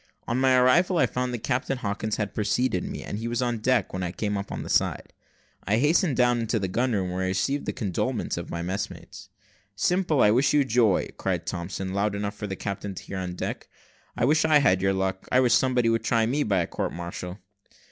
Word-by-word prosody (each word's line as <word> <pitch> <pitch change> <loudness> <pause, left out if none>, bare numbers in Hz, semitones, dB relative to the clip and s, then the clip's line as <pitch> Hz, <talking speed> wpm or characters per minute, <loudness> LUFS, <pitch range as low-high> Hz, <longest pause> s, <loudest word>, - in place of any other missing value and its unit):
On 120 +2 0
my 130 -1 +4
arrival, 170 +9 +4
I - - +5
found 125 0 -2
that 120 -2 -5
Captain 130 +2 -1
Hawkins 105 -1 -2
had 105 -2 -3
preceded 110 -2 0
me, - - -6
and 105 - -5
he 115 - -4
was 120 0 -2
on 120 -2 0
deck 130 +3 +1
when 95 - -3
I 90 -1 -2
came 105 +2 -2
up 100 0 -3
the - - -6
side. - - 0 0.5
I 105 +4 +1
hastened 150 +2 +2
down 120 -1 +3
into 115 0 0
the 95 -3 -1
gun 120 +6 0
room, 95 -3 -1
where 90 +1 -2
I 95 - 0
received 115 +10 -1
the - - +1
condolements 95 -6 -2
of - - -6
my 85 0 -4
messmates. 95 +4 -6 0.5
"Simple, 170 - +2
I 105 - +6
wish 130 +7 +3
you 145 -2 +4
joy," 115 -6 +2
cried - - -2
Thompson, 95 +2 -4
loud 100 +1 0
enough 100 0 -3
for 105 - -5
the 95 - -4
captain 100 0 -5
to - - -8
hear 95 - -5
on 90 -1 -4
deck. - - -5 0.5
"I - - +2
wish 150 +3 +3
I 155 -1 +5
had 95 -10 +3
your 95 0 +2
luck; 95 0 -2
I 130 - +5
wish 125 -2 +4
somebody 125 -3 +3
would 115 0 +1
try 115 -2 +2
me 135 +6 0
by 100 -9 +2
a - - 0
court - - -3
martial." 85 +1 -6
110 Hz, 230 wpm, -26 LUFS, 95-125 Hz, 0.5 s, I